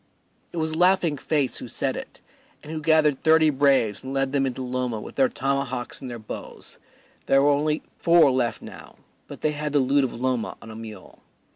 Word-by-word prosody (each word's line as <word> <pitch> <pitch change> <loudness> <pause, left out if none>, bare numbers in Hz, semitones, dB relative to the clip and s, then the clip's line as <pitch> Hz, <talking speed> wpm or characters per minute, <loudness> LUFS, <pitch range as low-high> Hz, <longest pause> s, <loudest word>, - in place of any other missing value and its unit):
It - - -8
was 160 -1 0
Laughing 180 -2 +3
Face 140 -1 -1
who - - -7
said - - -1
it, - - -9 0.4
and 150 - -9
who 160 -1 -4
gathered 155 -3 +3
thirty 160 -1 +5
braves 135 -6 +2
and 135 +1 -5
led 135 0 0
them 135 -1 +1
into 130 0 -4
Loma 125 -2 -2
with - - -9
their 265 -1 +2
tomahawks 135 - -3
and 130 - -6
their 120 - -6
bows; 110 -2 -9 0.5
there 135 0 +4
were 145 - +5
only 150 +2 0 0.2
four 170 -4 +5
left 125 -2 -1
now, - - -12 0.3
but - - -10
they 155 - +1
had 150 0 -4
the 145 - +4
loot 135 +2 +3
of 125 -2 -3
Loma 125 -2 -2
on 110 - -11
a - - -10
mule. 110 -4 -10
140 Hz, 205 wpm, -24 LUFS, 125-155 Hz, 0.5 s, thirty